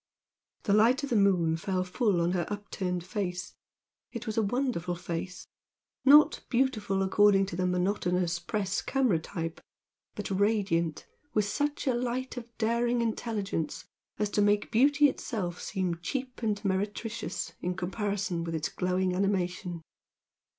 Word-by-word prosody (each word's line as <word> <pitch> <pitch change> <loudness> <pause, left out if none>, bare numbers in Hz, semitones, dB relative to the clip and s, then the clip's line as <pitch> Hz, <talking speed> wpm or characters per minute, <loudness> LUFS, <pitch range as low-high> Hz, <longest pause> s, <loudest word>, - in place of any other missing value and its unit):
The 200 - +2
light 235 +6 +4
of 280 - -4
the - - +2
moon 180 -6 +3
fell 185 +2 -1
full 185 -1 +1
on 170 +1 +2
her 180 -2 -1
upturned 190 -3 -3
face. 180 -1 -4 0.6
It 235 -1 -6
was 220 -2 -3
a 225 - +3
wonderful 215 -6 -1
face, 175 +1 -5 0.6
not 290 +3 +7
beautiful 215 -7 +1
according 195 0 +4
to 190 -2 -6
the 180 +1 0
monotonous 180 -1 0
press 195 +2 -2
camera 255 -11 +2
type, 165 0 -5 0.5
but - - -5
radiant 190 -5 +1 0.3
with 210 -2 +3
such 290 +9 -1
a 260 - +2
light 250 +2 -2
of 240 -1 -7
daring 235 +1 +1
intelligence 215 -7 -2 0.3
as 210 -1 -1
to 205 - +2
make 205 +2 +2
beauty 290 +5 +5
itself 195 -10 -3
seem 185 -4 -2
cheap 255 +6 -4
and 215 -2 -1
meretricious 205 +4 -2
in 180 +1 -2
comparison 190 -1 -2
with 165 -1 -3
its 160 0 -1
glowing 185 0 0
animation. 180 -3 -1
200 Hz, 145 wpm, -29 LUFS, 180-230 Hz, 0.6 s, not